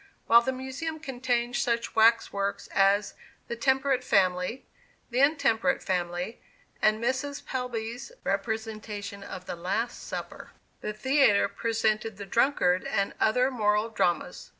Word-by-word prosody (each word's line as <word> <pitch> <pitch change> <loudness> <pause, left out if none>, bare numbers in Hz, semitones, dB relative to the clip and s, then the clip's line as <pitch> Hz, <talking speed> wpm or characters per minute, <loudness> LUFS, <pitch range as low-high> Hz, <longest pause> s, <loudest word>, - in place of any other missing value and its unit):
While 235 +1 +7
the 260 +2 -1
Museum 265 +5 -5
contained 245 -4 -1
such 235 -1 0
wax 225 +1 +4
works 200 0 -2
as 200 +1 +3 0.3
"The 235 - -3
Temperate 265 +1 +1
Family," 185 +3 +1 0.5
"The 245 - 0
Intemperate 270 - +2
Family," 180 +3 -2 0.4
and 215 0 +3
Mrs. 265 +4 -2
Pelby's 245 - -4
representation 210 -1 -3
of 185 -2 -8
"The - - -5
Last 200 +8 -2
Supper," - - -7 0.3
the 210 - -3
theatre 260 -3 +3
presented 225 -1 -1
"The 200 - -7
Drunkard" 195 -5 +2
and 200 0 -1
other 250 +4 +3
moral 210 -2 +1
dramas. 175 -6 -1
225 Hz, 125 wpm, -28 LUFS, 200-255 Hz, 0.5 s, While